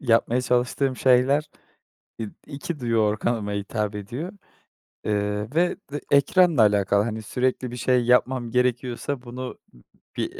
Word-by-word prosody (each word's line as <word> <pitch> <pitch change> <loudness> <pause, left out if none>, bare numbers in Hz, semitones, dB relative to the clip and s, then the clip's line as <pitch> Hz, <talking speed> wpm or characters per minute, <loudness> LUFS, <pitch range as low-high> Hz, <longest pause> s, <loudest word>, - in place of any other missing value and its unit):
yapmaya 120 0 +2
çalıştığım 125 +2 0
şeyler, 135 +4 +3 0.7
eee, 110 -2 -4 0.2
2 150 +3 -5
duyu 115 -2 0
organıma 105 0 0
hitap 100 +1 -2
ediyor. 120 - -5 0.7
Eee, 105 0 -1
ve 175 +2 +2
ve 145 0 -4
ekranla 150 +1 +4
alakalı, 100 -1 +3
hani, 110 0 -3
sürekli 125 +2 -1
bir 125 - -6
şey 125 0 +2
yapmam 125 0 +2
gerekiyorsa 125 +2 -1
bunu 125 +1 -7 0.2
ı - - -18 0.4
bir - - -3
125 Hz, 135 wpm, -24 LUFS, 105-130 Hz, 0.7 s, ekranla